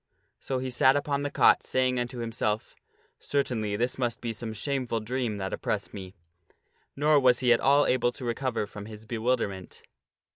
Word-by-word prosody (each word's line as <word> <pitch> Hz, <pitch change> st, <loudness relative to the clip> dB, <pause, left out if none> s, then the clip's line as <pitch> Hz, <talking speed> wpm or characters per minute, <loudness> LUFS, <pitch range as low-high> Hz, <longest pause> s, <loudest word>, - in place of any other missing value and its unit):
So 135 Hz, -, -3 dB
he 130 Hz, 0 st, -3 dB
sat 130 Hz, +2 st, +4 dB
upon 145 Hz, 0 st, 0 dB
the 145 Hz, -, -2 dB
cot, -, -, +5 dB
saying 130 Hz, -1 st, 0 dB
unto 120 Hz, +1 st, -4 dB
himself, 110 Hz, -2 st, -2 dB, 0.2 s
" -, -, -37 dB
Certainly 115 Hz, -7 st, -1 dB
this 120 Hz, +4 st, -1 dB
must 120 Hz, -2 st, -1 dB
be 115 Hz, -1 st, -3 dB
some 110 Hz, +1 st, -5 dB
shameful 125 Hz, 0 st, -2 dB
dream 115 Hz, -1 st, -2 dB
that 95 Hz, -1 st, -4 dB
oppresses -, -, -3 dB
me." 95 Hz, -1 st, -8 dB, 0.8 s
Nor 150 Hz, +1 st, +4 dB
was 125 Hz, -2 st, +4 dB
he 125 Hz, -2 st, +4 dB
at 115 Hz, -, +2 dB
all 140 Hz, +2 st, +4 dB
able 120 Hz, -1 st, +2 dB
to 130 Hz, -, -8 dB
recover 120 Hz, -2 st, -1 dB
from 105 Hz, 0 st, -9 dB
his 110 Hz, 0 st, -10 dB
bewilderment. 110 Hz, -5 st, -2 dB
120 Hz, 180 wpm, -28 LUFS, 110-130 Hz, 0.8 s, cot